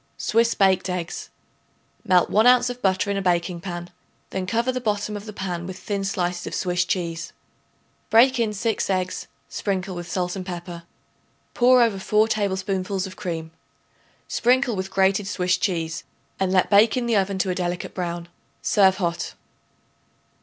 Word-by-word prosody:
Swiss 230 +1 +2
Baked 190 -1 +3
Eggs. 180 -2 -4 0.7
Melt 180 -1 +3
1 220 +3 +5
ounce 250 0 +5
of 245 0 -9
butter 190 +1 +1
in 200 - -1
a - - -1
baking 175 -1 0
pan; 175 -1 -6 0.4
then 190 -1 -3
cover 235 +5 +1
the 255 0 -3
bottom 210 -2 -1
of 205 +1 -7
the - - -5
pan 180 -4 -4
with 190 -1 -7
thin 200 0 -3
slices 180 -2 -2
of - - -4
Swiss 180 -1 0
cheese. 170 -2 -3 0.8
Break 250 +3 +5
in 225 -2 +1
6 215 +1 -1
eggs; 185 -1 -1 0.2
sprinkle 190 -1 -2
with 175 -1 -7
salt 180 0 -1
and 190 - -4
pepper. 175 -2 -7 0.7
Pour 250 0 +6
over 215 -4 0
4 215 +3 +3
tablespoonfuls 195 -2 -1
of 185 -1 -8
cream; 165 -4 -5 0.8
sprinkle 250 -1 +2
with 190 0 -3
grated 195 +1 +2
Swiss 180 -2 +1
cheese, 165 -3 -2 0.4
and 190 -1 +1
let 185 +1 +2
bake 215 +4 +5
in 245 - 0
the 235 -1 +1
oven 195 -1 +1
to 185 0 0
a - - 0
delicate 175 -1 -3
brown. 175 -2 -4 0.4
Serve 190 -3 +4
hot. 170 -3 -2
190 Hz, 165 wpm, -23 LUFS, 180-210 Hz, 0.8 s, Pour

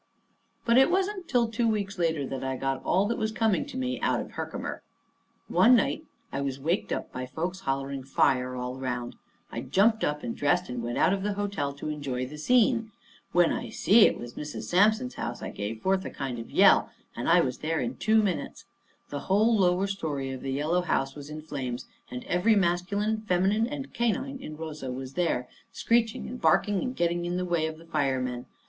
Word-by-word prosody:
But 235 +2 +5
it 265 - +6
wasn't 380 0 0
till 240 -3 +2
two 230 +1 0
weeks 200 -3 -1
later 160 -4 +1
that 135 0 -5
I 130 0 -2
got 135 0 -2
all 190 +2 +2
that 230 - -1
was 220 -1 0
coming 220 +2 +1
to 275 - -7
me 255 0 -2
out - - +1
of - - -6
Herkimer. - - -5 0.7
One 250 +2 +6
night 305 +6 +1 0.3
I 140 - -1
was 135 -1 -3
waked 165 +8 -1
up - - -3
by 125 0 -5
folks 170 +8 -3
hollering 135 -2 -2
"Fire!" 130 -1 +1
all 125 +1 -4
around. 125 -2 -3 0.4
I 115 - -4
jumped 200 - +3
up 150 0 -1
and 115 - -3
dressed 175 +5 +1
and 125 -1 -3
went 120 +1 -3
out - - +4
of 195 - -1
the 205 +1 -1
hotel 200 -8 -2
to 145 +2 -6
enjoy 140 -4 -3
the 150 +4 -9
scene. 230 - +3 0.4
When 175 -1 +4
I - - -4
see 210 +4 +6
it - - -1
was 120 0 -8
Mrs. 150 0 -6
Sampson's 215 +7 +3
house, 120 - -5
I - - -4
gave 110 +2 -5
forth 190 0 +2
a - - -5
kind 130 -4 -4
of 115 - -8
yell, - - +5 0.3
and 120 - -2
I 175 +1 +6
was 130 -5 -2
there 160 +1 -1
in 245 - -2
two 220 0 +3
minutes. 190 -4 -3 0.4
The 145 - -4
whole 215 +4 +4
lower 185 -1 +3
story 150 -9 -3
of 130 - -6
the 135 - -3
yellow 155 +6 +1
house 135 -6 0
was 145 0 -9
in 155 0 -7
flames, 130 -5 -4 0.2
and 125 0 -6
every 195 +6 +2
masculine, 200 +4 +1
feminine, 195 +5 +2
and 275 +1 -6
canine 260 +4 -1
in 155 -8 -8
Rosa 155 -5 -5
was 130 +1 -6
there, 160 -8 0 0.2
screeching 230 -1 +1
and 250 - -7
barking 205 -3 +3
and 255 0 -3
getting 175 -2 0
in 175 +1 -1
the 180 - -1
way 170 -3 +1
of 160 0 -6
the 165 - -15
firemen. 130 -6 -1
170 Hz, 210 wpm, -28 LUFS, 135-215 Hz, 0.7 s, it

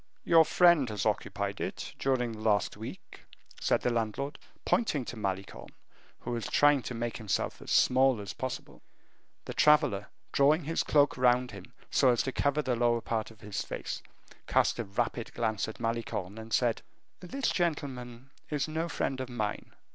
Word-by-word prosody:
"Your 165 -1 +6
friend 170 -8 +5
has 105 -3 -3
occupied - - -1
it - - -4
during 130 -3 +1
the 110 - -8
last 105 -4 +1
week," - - -9 0.4
said - - +2
the 125 - +1
landlord, 115 +5 -2 0.3
pointing 150 - +1
to - - -6
Malicorne, 95 -3 -5 0.5
who - - -5
was 115 -4 -2
trying 145 -2 +4
to 125 - -5
make 115 0 -3
himself 105 -5 -2
as - - -9
small 130 -2 +4
as 100 -1 -6
possible. 130 -1 -6 0.6
The - - -5
traveler, 145 -10 +4 0.2
drawing 150 +4 +4
his 165 +3 0
cloak 145 -2 +3
round 125 0 +3
him 100 -3 -11 0.2
so 135 - +4
as 120 -2 +3
to 135 - -2
cover 145 +3 +1
the 125 -3 0
lower 120 0 +2
part 110 -2 -2
of 110 -1 -17
his 105 -2 -4
face, - - -5 0.5
cast - - +2
a 115 - -2
rapid 115 +3 -3
glance 110 -3 0
at 110 - -8
Malicorne, 115 -4 -3
and 110 0 -10
said, 120 -2 +2 0.4
"This 260 +8 -2
gentleman 135 -7 -3 0.2
is 150 -1 -1
no 160 +2 -2
friend 135 -3 -2
of 130 - -5
mine." 110 -4 -4
120 Hz, 170 wpm, -30 LUFS, 110-140 Hz, 0.6 s, Your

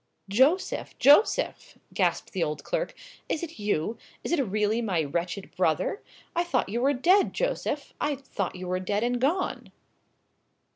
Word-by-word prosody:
"Joseph!—Joseph!" 290 - +3 0.2
gasped - - 0
the 190 - -2
old 150 -1 -3
clerk; - - -2 0.3
"is 320 - -1
it 320 -7 -7
you? 210 +1 -1 0.2
Is - - -3
it 340 -4 +3
really 215 0 0
my 185 -8 0
wretched 175 +6 -4
brother? 180 - +1 0.3
I 345 - +2
thought 270 - 0
you 235 +4 -1
were 275 +3 +3
dead, 360 +10 +4
Joseph—I 295 - -2
thought 255 -10 -4
you 180 0 -6
were 185 +1 0
dead 205 +3 -1
and 245 0 0
gone!" 335 +8 0
240 Hz, 145 wpm, -27 LUFS, 190-305 Hz, 0.3 s, dead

